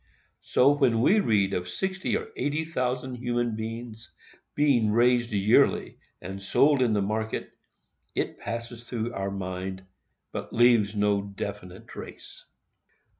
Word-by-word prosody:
So, 135 +3 +4
when 135 -6 +2
we 200 - +5
read 105 - +2
of 90 0 -2
sixty 190 - -1
or 450 0 -7
eighty 150 +2 -1
thousand 125 -4 -2
human 120 -2 -1
beings 110 0 -7 0.4
being 135 -7 +3
raised 120 +1 +3
yearly 105 +1 +3 0.2
and 95 +2 -7
sold 140 +8 +3
in 120 -3 +3
the 100 -1 +1
market, 110 +2 -3 0.6
it - - -2
passes 115 0 -6
through 120 -1 -4
our 95 0 -2
mind, 95 0 -5 0.5
but - - -6
leaves 115 -3 +4
no 105 -1 +2
definite 100 -2 -7
trace. - - -10
115 Hz, 130 wpm, -27 LUFS, 100-125 Hz, 0.6 s, we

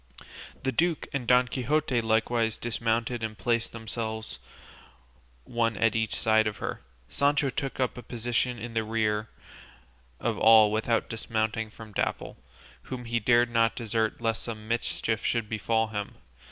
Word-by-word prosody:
The 135 - +1
duke 165 +5 0
and 130 -4 -2
Don 125 0 +5
Quixote 130 0 0
likewise 115 0 +1
dismounted 115 +1 -1
and 110 -1 -4
placed 115 +3 0
themselves 110 -1 -4 1.0
one 115 - 0
at 115 -1 +2
each 110 -1 0
side 110 -1 +3
of 105 - -3
her. - - -4 0.3
Sancho 140 - +1
took 135 +2 -4
up 125 -1 0
a - - -7
position 120 +1 -1
in 115 +1 -7
the 115 -1 +1
rear 110 -1 0 0.9
of - - -1
all 110 -1 +7
without 110 +1 +1
dismounting 110 0 -2
from 110 0 -12
Dapple, - - -2 0.5
whom 125 -2 -5
he 115 0 0
dared 120 +2 +3
not 115 -1 +3
desert 110 -1 -1
lest 115 -1 -1
some 110 -2 -6
mischief 115 -1 -1
should 115 -2 0
befall 110 +1 0
him. 105 -2 -4
115 Hz, 150 wpm, -28 LUFS, 110-120 Hz, 1.0 s, all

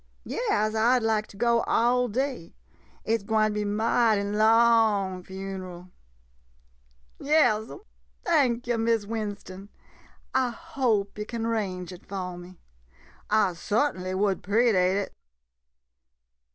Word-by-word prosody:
Yas, 215 - -1
I 230 +3 +3
'd 245 - -3
like 220 -1 0
to 200 - -15
go 235 +1 +2
all 245 +2 +2
day 250 -5 -3 0.2
— - - -32
it 225 0 +1
's - - -17
gwine 215 0 +1
be 210 0 -1
mighty 215 0 +2
long 215 -2 +3
funeral. 185 -1 -8 1.3
Yas 250 -8 +2
'm 140 - -10 0.2
— - - -39
thank 245 -3 +2
yo' 240 -1 0
— - - -3
Miss 225 -2 +1
Winston, 205 -3 -6 0.6
I 260 -1 +2
hope 235 -9 -2
yo' 210 - -3
can 230 0 -4
'range 190 -6 -2
it 180 - -14
fo' 185 -2 -5
me. 175 +1 -12 0.7
I 210 -3 +3
sut'nly 185 0 -1
would 195 0 0
'predate 200 -3 +2
it. 200 0 -3
215 Hz, 135 wpm, -26 LUFS, 195-235 Hz, 1.3 s, I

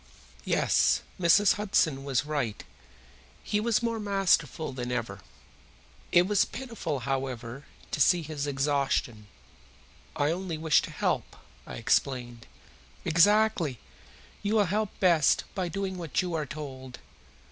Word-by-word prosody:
Yes, - - +2 0.2
Mrs. 185 +4 +5
Hudson 160 -9 +1
was 135 0 0
right. 140 -9 -3 0.8
He 210 - 0
was 230 +1 +1
more 230 -1 -1
masterful 195 -7 +1
than 125 -1 -4
ever. 115 -5 -3 0.9
It 175 +1 +5
was 205 0 +3
pitiful, 230 - -5
however, 130 0 -4 0.3
to 150 - -1
see 175 +4 +4
his 145 -2 -4
exhaustion. 135 -6 -1 0.9
"I 145 +2 +1
only 175 -1 -3
wished 155 0 +3
to - - -10
help," - - -2 0.3
I - - -7
explained. 120 0 -1 0.6
"Exactly! 175 - +3 0.6
You 205 +2 0
will 210 -2 +4
help 210 +3 -1
best 170 -6 +4
by 185 -2 -2
doing 190 0 -4
what 165 -5 -2
you 180 -1 -4
are 155 -3 -2
told." 130 -3 -8
155 Hz, 125 wpm, -28 LUFS, 135-195 Hz, 0.9 s, Mrs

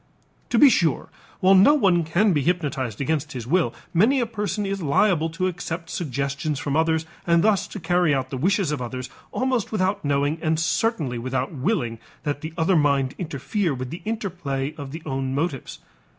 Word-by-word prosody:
To 235 - +1
be 290 - +8
sure, 170 - +1 0.3
while 190 +1 +6
no 195 +10 +7
one 185 - +3
can 180 +6 +2
be 145 - +1
hypnotized 140 - -1
against 150 +1 -1
his 125 -3 -5
will, 170 +7 +2 0.2
many 225 +11 +4
a 240 - +1
person 210 -2 -3
is 195 0 -3
liable 165 +2 +2
to 185 +3 -2
accept 170 -2 -4
suggestions 140 - -2
from 145 -1 -2
others 160 0 +2 0.2
and 170 0 +4
thus 200 -2 +2
to 205 - -7
carry 175 -1 +2
out 130 -2 -1
the 135 - -3
wishes 185 +3 +1
of 145 -4 -2
others 125 +1 -5 0.2
almost 255 -4 -1
without 200 -1 0
knowing 145 +2 0
and 160 -1 +1
certainly 165 - 0
without 130 +2 -2
willing 130 - -1 0.2
that 145 -1 -2
the 155 - -5
other 170 +3 +2
mind 140 -3 +2
interfere 160 - -2
with 125 0 -5
the 170 - -6
interplay 175 -11 -3
of 140 -3 -8
the 160 +2 -7
own 135 -2 -2
motives. 140 - -3
160 Hz, 185 wpm, -24 LUFS, 140-190 Hz, 0.3 s, be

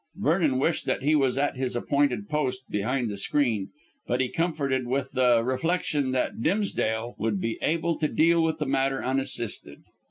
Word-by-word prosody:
Vernon 155 -4 +1
wished 155 +5 0
that - - -1
he 150 +3 +3
was 135 -4 +2
at 140 -1 0
his 130 -2 -2
appointed 125 -4 0
post 130 -4 -1
behind 120 +5 0
the 105 -2 -4
screen; 110 -3 0 0.4
but 125 - 0
he 130 -1 +1
comforted 140 -7 -1
with 135 +2 -1
the 125 -3 +3
reflection 145 +1 0
that 130 -3 -1
Dimsdale 120 - 0
would 110 -2 0
be 115 +3 -3
able 165 +1 0
to 155 - +2
deal 165 +2 +3
with 160 -1 0
the 150 - -2
matter 135 0 0
unassisted. 130 -3 -1
135 Hz, 170 wpm, -26 LUFS, 120-150 Hz, 0.4 s, he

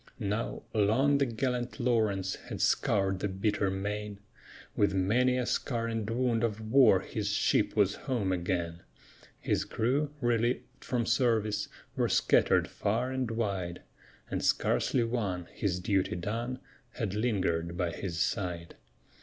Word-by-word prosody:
Now, 105 0 -2
long 120 +7 +3
the 140 - +2
gallant 125 +2 -2
Lawrence 110 -6 +1
had - - -8
scoured 95 -2 +2
the 100 - -1
bitter 100 +1 0
main; 105 +1 -3 0.6
With 100 -2 +2
many 125 +7 +2
a 125 - 0
scar 115 -2 -1
and 115 -2 -2
wound 120 -1 +1
of 110 -2 0
war 115 -8 +6
his 100 +1 -3
ship 105 - +2
was 100 -2 +3 0.2
home 110 -7 +1
again; 85 -1 -2 0.6
His - - 0
crew, 140 +6 0
relieved 120 -1 +1 0.2
from 120 -2 -1
service, 110 -4 +1 0.3
were - - +1
scattered - - +3
far 115 +5 -1
and 130 -3 -1
wide, 100 -6 -2 0.5
And - - -2
scarcely 125 - +2
one, 105 -7 -2
his 90 -3 -1
duty 95 0 0
done, 115 +8 -3 0.4
had 105 -5 -3
lingered 90 -7 0
by 85 -1 0
his 85 -3 -4
side. 90 -3 -2
105 Hz, 135 wpm, -30 LUFS, 95-120 Hz, 0.6 s, war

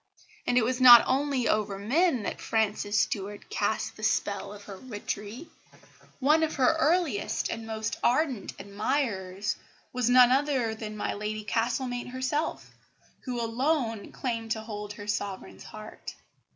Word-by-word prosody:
And 245 - +2
it 235 - +4
was 255 +2 -1
not 245 -2 +11
only 270 -2 +1
over 210 -2 0
men 260 - +1
that - - -4
Frances 210 -2 0
Stuart 205 0 -2
cast 215 +1 -1
the - - -12
spell 200 -2 0
of 205 0 -11
her 195 -2 -9
witchery. 215 +3 -6 0.7
One 300 +4 +4
of 320 -1 0
her 275 +4 +3
earliest 315 - +1
and 225 0 -5
most 220 -1 -3
ardent 255 -3 +1
admirers 200 -3 -2 0.4
was 250 -1 +1
none 250 0 +7
other 265 -4 +1
than 215 -1 -7
my - - -2
Lady 215 +1 -4
Castlemaine 245 +3 -1
herself, 260 +5 -2 0.5
who 250 -2 -3
alone 235 -1 -1
claimed 230 -3 -3
to 220 - -5
hold 210 -2 -6
her 205 0 -9
Sovereign's 200 -2 -4
heart. 215 0 -9
225 Hz, 145 wpm, -28 LUFS, 210-260 Hz, 0.7 s, not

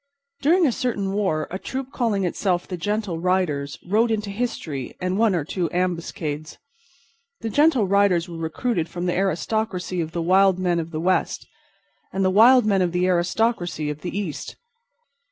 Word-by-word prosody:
During 340 +5 +4
a 275 - +3
certain 205 -6 -2
war 190 -7 0
a 190 - -4
troop 265 +3 -5
calling 220 -7 0
itself 180 0 -1
the 185 - -4
Gentle 205 -1 -2
Riders 165 -6 0
rode 220 +6 +2
into 210 -2 -1
history 180 - -4
and 185 0 -1
one 215 -2 +3
or 160 -4 -1
two 170 +1 -2
ambuscades. 165 -4 -3 0.8
The 225 -1 -3
Gentle 290 -4 +4
Riders 195 -3 +3
were 170 -1 -8
recruited 165 +2 -2
from 175 +1 -4
the 175 - +1
aristocracy 190 -1 -1
of 160 -1 -4
the 170 0 -2
wild 190 +1 +4
men 180 -2 +1
of 165 0 -4
the 155 -2 -4
West 185 +3 0 0.6
and 195 0 0
the 185 - +3
wild 235 +4 +6
men 200 -3 +2
of 175 -1 0
the 180 +1 +1
aristocracy 175 -3 0
of 150 +1 -8
the 180 +2 -4
East. 185 -8 -4
185 Hz, 170 wpm, -23 LUFS, 170-210 Hz, 0.8 s, wild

